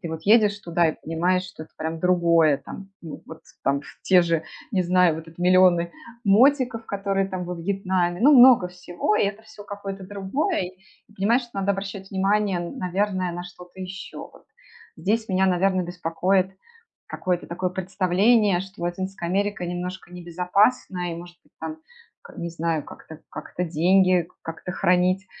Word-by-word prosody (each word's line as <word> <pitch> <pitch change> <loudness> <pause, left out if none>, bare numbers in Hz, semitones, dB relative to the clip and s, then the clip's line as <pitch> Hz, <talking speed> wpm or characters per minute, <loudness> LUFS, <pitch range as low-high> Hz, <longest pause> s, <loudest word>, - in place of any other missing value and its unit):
Ты 170 - -5
вот 160 0 -6
едешь 210 0 +4
туда 170 -1 +1
и - - -3
понимаешь, 175 +3 0
что 180 -3 -10
это 160 0 -5
другое 170 -4 +4
там. 195 +7 -10
Ну 160 -3 -9
вот 160 - -11 0.2
там, 140 +1 0 0.2
те 185 -2 +5
же, 165 -2 0 0.3
не 185 -2 +2
знаю, 180 -2 +3
в - - -6
этот 165 0 -12
миллионы 180 -1 +4 0.3
мотиков, 240 +2 +3
которые 195 -1 -1
там 185 -2 -4
во 180 0 -4
Вьетнаме. 185 -1 -1
Ну, 290 +3 +7
много 245 -6 +8
всего, 180 +3 -2
и - - +3
это 205 +2 -5
всё 220 -1 -13
какое-то 200 -1 -7
другое. 200 - -2 0.4
И - - -22
понимаешь, 225 +6 +2
надо 195 0 0
обращать 195 0 -6
внимание, 195 0 +1
наверное, 185 -1 -2
на 175 +1 -5
что-то 180 +1 -14
еще 190 +1 -8
вот. - - -12 0.5
Здесь 220 +3 -1
меня, 190 0 +2
наверное, 185 0 +2
беспокоит 180 +2 0 0.6
какое-то 180 -1 -2
такое 180 +1 -2
представление, 190 +2 +2
что 190 0 -9
Латинская 175 +1 -3
Америка 200 -1 -1
немножко 180 +1 -5
небезопасна 180 +1 0
и, - - -6
может 175 +1 -11
быть, - - -32
там, 315 - -5 0.4
к 470 - -14
не 170 - -4
знаю, 165 -2 -2
как-то 160 -1 -12
как-то 180 - -5
деньги 180 +1 +3
как-то 165 +2 -7
хранить, 180 +2 +2
185 Hz, 160 wpm, -24 LUFS, 175-200 Hz, 0.6 s, много